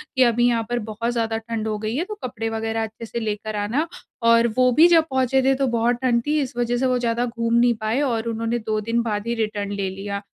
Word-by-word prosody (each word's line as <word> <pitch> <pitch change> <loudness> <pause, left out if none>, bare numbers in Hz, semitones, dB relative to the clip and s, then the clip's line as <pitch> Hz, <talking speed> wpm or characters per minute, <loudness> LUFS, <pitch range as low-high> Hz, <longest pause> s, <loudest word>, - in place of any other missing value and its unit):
कि 260 - +5
अभी 240 0 +3
यहाँ 230 -2 +1
पर 240 0 0
बहुत 230 +3 -2
ज़्यादा 225 -1 -1
ठंड 225 -1 -4
हो 215 -1 -1
गई 215 +2 -3
है, 310 - 0
तो 425 - -6
कपड़े 230 -3 -3
वग़ैरह 225 0 -2
अच्छे 220 +1 -7
से 235 - -4
लेकर 215 -1 -3
आना। 230 +11 -1 0.4
और 230 0 +5
वो 255 0 +5
भी 315 +8 +7
जब 330 -2 +5
पहुँचे 265 0 +2
थे 270 +1 +4
तो 270 0 0
बहुत 235 0 +1
ठंड 240 -2 +2
थी, 305 +1 +2
इस 265 - -4
वजह 240 0 0
से 260 - 0
वो 255 -1 +2
ज़्यादा 240 0 0
घूम 230 -1 -2
नहीं 240 0 +4
पाए 220 +6 0
और 235 -5 -1
उन्होंने 230 +1 -1
2 215 -1 -2
दिन 230 +2 0
बाद 210 -1 -3
ही 235 - 0
रिटर्न 210 -3 -2
ले 200 -1 -2
लिया। 200 +1 -5
230 Hz, 255 wpm, -22 LUFS, 220-245 Hz, 0.4 s, भी